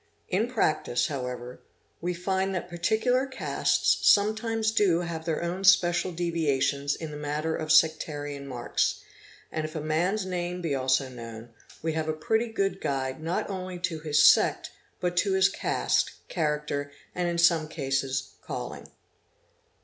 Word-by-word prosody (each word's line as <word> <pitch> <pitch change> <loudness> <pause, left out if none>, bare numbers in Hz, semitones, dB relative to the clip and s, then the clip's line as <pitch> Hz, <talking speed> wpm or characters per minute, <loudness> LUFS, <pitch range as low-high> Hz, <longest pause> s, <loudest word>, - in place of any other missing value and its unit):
In 205 +5 +1
practice 155 - 0
however, 125 -3 -5 0.4
we 175 +1 -2
find 190 +2 -1
that 180 - -3
particular 225 +9 +1
castes 265 0 +1
sometimes 220 +1 +3
do 190 -6 +3
have 165 -2 -5
their 165 0 -1
own 175 +3 -3
special 185 -1 +4
deviations 145 -5 0
in 160 -2 -6
the 150 - -6
matter 150 +2 -2
of 155 -1 -2
sectarian 145 -3 +2
marks, 125 -3 -1 0.5
and 155 - -2
if 155 +1 -6
a - - -1
man's 175 +7 0
name 180 -1 -3
be 165 -5 -2
also 130 0 +1
known, 115 -2 -9 0.3
we 160 -1 0
have 160 0 -2
a - - +1
pretty 220 +10 0
good 200 -3 -1
guide 135 0 -2
not 165 +3 -1
only 185 -2 -5
to 175 -2 -3
his 150 -1 +3
sect - - +4 0.3
but 180 -1 -1
to 195 +2 +2
his 190 0 +5
caste, - - 0 0.2
character, 150 -3 -1 0.2
and 180 -1 -1
in 170 - -2
some 170 -2 +4
cases 135 -3 -2
calling. - - -6
165 Hz, 150 wpm, -27 LUFS, 145-185 Hz, 0.5 s, his